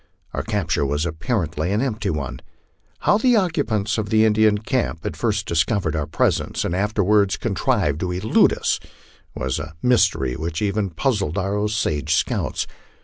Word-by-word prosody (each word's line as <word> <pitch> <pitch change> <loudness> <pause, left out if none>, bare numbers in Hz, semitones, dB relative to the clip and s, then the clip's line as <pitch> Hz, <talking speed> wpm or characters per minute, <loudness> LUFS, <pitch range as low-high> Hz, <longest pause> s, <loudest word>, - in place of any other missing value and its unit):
Our - - -1
capture 100 -9 -1
was 75 +3 0
apparently 80 0 -2
an 105 - +1
empty 110 -6 -1
one. 75 -6 -3 0.6
How 205 - +3
the 245 +1 +4
occupants 130 - 0
of 105 -1 -3
the 110 0 +4
Indian 110 -1 +4
camp 110 -6 -2
had - - -3
first - - -1
discovered 85 +1 0
our 75 -2 -2
presence - - 0
and 85 - -1
afterwards 100 0 +2
contrived 100 - 0
to 90 +1 -2
elude 95 +5 +3
us - - 0 0.6
was 65 0 -2
a 80 0 -7
mystery 115 - +3
which 80 +2 -3
even 100 -1 0
puzzled 95 - -1
our 95 +1 -1
Osage 105 -8 0
scouts. - - -1
100 Hz, 155 wpm, -22 LUFS, 80-110 Hz, 0.6 s, the